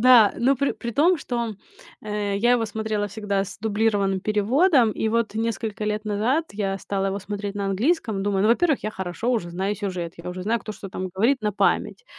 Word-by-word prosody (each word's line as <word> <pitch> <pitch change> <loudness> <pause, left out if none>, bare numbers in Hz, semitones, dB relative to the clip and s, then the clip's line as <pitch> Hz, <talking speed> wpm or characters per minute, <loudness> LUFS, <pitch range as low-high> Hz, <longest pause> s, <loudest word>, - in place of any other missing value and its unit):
Да, 240 -4 +7
но 260 +4 +3
при 280 +2 +1
при 235 - -5
том, 340 +8 +4
что, 235 -6 -3 0.5
э, 210 -1 -2
я 240 +4 +3
его 235 -2 +2
смотрела 220 -1 -2
всегда 200 -1 -2
с 200 +1 -10
дублированным 205 -3 +1
переводом, 230 - +3
и 220 - -1
вот 230 -1 0
несколько 225 -1 -2
лет 210 0 -2
назад 220 +9 +1
я 195 -1 -2
стала 195 0 -2
его 195 +1 -1
смотреть 205 0 -5
на 200 - -2
английском, 220 - 0
думаю: 195 -1 +1
"Ну, 215 - +3
во-первых, 295 +3 +2
я 215 - -1
хорошо 190 +4 -3
уже 175 -8 -1
знаю 190 +4 -1
сюжет, 180 -4 -4
я 170 +1 -6
уже 180 0 -6
знаю, 225 +3 0
кто 215 - -6
что 200 -1 -9
там 185 0 -4
говорит 220 +8 +1
на 210 -1 0
память". 355 - 0
210 Hz, 205 wpm, -24 LUFS, 195-230 Hz, 0.5 s, Да